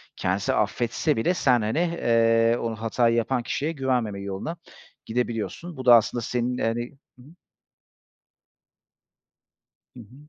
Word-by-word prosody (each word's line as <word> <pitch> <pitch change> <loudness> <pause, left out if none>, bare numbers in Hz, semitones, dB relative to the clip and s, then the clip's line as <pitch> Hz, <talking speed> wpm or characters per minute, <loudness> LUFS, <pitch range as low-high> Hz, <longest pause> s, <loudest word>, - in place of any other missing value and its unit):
kendisi 95 +2 -1
affetse 115 +7 0
bile 170 +11 +1
sen, 125 -8 +2
hani, 110 +8 -1
eee, 115 -8 +2
onu 115 -2 -3
hatayı 115 +1 +1
yapan 120 +1 0
kişiye 145 +6 -2
güvenmeme 125 -8 -1
yoluna 100 - -5 0.5
gidebiliyorsun. 125 +8 -3
Bu 130 - -7
da 120 -1 +9
aslında 115 +1 +2
senin, 125 +2 -2
hani 120 +1 -2 0.3
Hı - - -14
hı. 145 - -16 2.6
Hı - - -11
hı. 115 +2 -14
120 Hz, 130 wpm, -25 LUFS, 115-130 Hz, 2.6 s, da